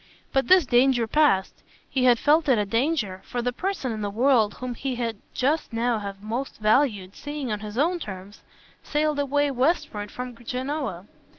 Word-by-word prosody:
But 270 0 +2
this 370 -3 +6
danger 245 -1 +3
passed 225 -7 +2 0.3
he 255 -2 0
had 245 -1 +6
felt 300 +4 +3
it 255 - +5
a 210 - +1
danger, 225 - -1
and 240 0 -1
the 245 - 0
person 365 -5 -2
in 215 -1 -4
the 205 - -2
world 225 -1 +3
whom 250 -1 -5
he 260 +2 -3
would 230 -3 -3 0.2
just 290 +5 0
now 230 0 0
have 200 -1 -7
most 235 +5 -4
valued 215 -4 +1
seeing 290 -4 -5
on 210 - -2
his 210 +1 -7
own 345 +6 +2
terms 195 - -8 0.4
sailed 300 0 0
away 285 0 +1
westward 250 -6 0
from 250 +1 -6
Genoa. 255 - -3
245 Hz, 180 wpm, -25 LUFS, 215-285 Hz, 0.4 s, this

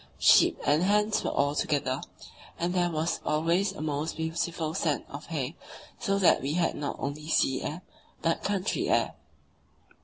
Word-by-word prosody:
Sheep - - +6
and 150 +3 +3
hens 210 +3 +2
were - - 0
all 145 0 +1
together, 145 -3 0 0.6
and 175 +1 -1
there 175 -1 +2
was 160 0 -1
always 170 +6 +1
a 195 - -8
most 150 +1 -2
beautiful 160 0 -2
scent 155 -4 0
of 140 +2 -8
hay, 150 -2 -3 0.4
so 195 0 0
that 190 -3 +4
we 140 +2 -2
had 170 0 +1
not 145 - -4
only 145 +2 -5
sea 135 -4 +2
air, 165 +4 -5 0.4
but 165 0 +1
"country 200 -1 -1
air." - - +2
160 Hz, 160 wpm, -28 LUFS, 150-175 Hz, 0.6 s, Sheep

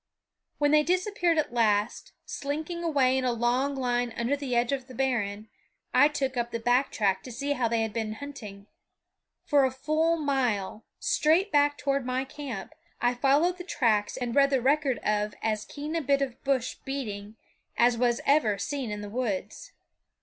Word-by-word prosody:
When 290 0 +2
they 305 0 +6
disappeared 355 0 +1
at 300 -5 0
last, 215 -2 +1
slinking 310 +4 -4
away 265 -5 +2
in - - -3
a 250 - +1
long 245 +4 0
line 245 -2 -1
under 235 +4 +1
the 275 -3 -3
edge 240 +1 +2
of 265 -2 -3
the 255 - -11
barren, 220 -5 -1 0.5
I 290 - +7
took 270 -3 -2
up 240 -1 -1
the 230 - -4
back 245 +4 +2
track 195 -3 +1
to 255 - -9
see 280 +5 -3
how 250 -4 0
they 230 0 +1
had 220 -2 -4
been 220 -2 -2
hunting. 220 -6 -9 0.8
For 285 -2 +4
a 265 - +3
full 310 +5 0
mile, 245 -9 -1 0.2
straight 345 +7 +2
back 290 0 +3
toward 275 -1 0
my 255 +1 -1
camp, 265 -7 -7 0.3
I 245 +1 +2
followed 285 +8 +2
the - - -5
tracks 230 - 0
and 245 -2 -3
read 275 -1 +5
the 270 -2 +2
record 275 0 +2
of 210 0 0
as 215 -1 -1
keen 300 +2 -6
a 330 - +1
bit 280 -1 +2
of 260 -3 -6
bush 265 -3 0
beating 215 -6 -5 0.4
as 240 0 +4
was 240 0 +1
ever 275 -8 +3
seen 275 +3 -3
in 210 0 -4
the 205 - -6
woods. 215 -4 -4
260 Hz, 185 wpm, -27 LUFS, 230-285 Hz, 0.8 s, I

